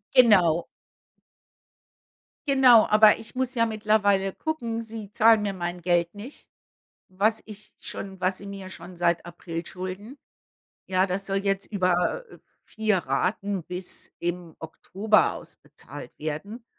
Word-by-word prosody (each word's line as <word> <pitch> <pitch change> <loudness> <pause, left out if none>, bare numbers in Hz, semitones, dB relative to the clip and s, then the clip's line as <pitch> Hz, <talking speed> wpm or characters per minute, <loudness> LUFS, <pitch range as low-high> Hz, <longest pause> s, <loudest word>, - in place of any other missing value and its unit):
Genau. 185 -10 +5 1.8
Genau, 255 -5 +6
aber 215 0 +6
ich 225 +3 -11
muss 260 0 -1
ja 230 -3 +2
mittlerweile 205 -3 +1
gucken, 235 -8 -3
sie 220 -2 -8
zahlen 220 0 +5
mir 200 -1 -1
mein 175 -1 -4
Geld 175 0 +1
nicht, 225 +8 -11 0.6
was 210 +4 0
ich 215 0 -12
schon 190 -1 -7
was 185 +1 +1
sie 200 - -10
mir 195 -1 -8
schon 185 -1 -10
seit 170 -1 +1
April 170 -1 -6
schulden. 190 +9 -7 0.7
Ja, 185 0 +2
das 195 +1 -3
soll 195 0 0
jetzt 195 0 -1
über, 185 - 0
äh, - - -15 0.2
4 215 -3 0
Raten 185 +7 -1
bis 180 +2 -6
im 175 -1 -4
Oktober 200 +6 +1
ausbezahlt - - -11
werden. 200 +10 -6
200 Hz, 130 wpm, -26 LUFS, 180-220 Hz, 1.8 s, Genau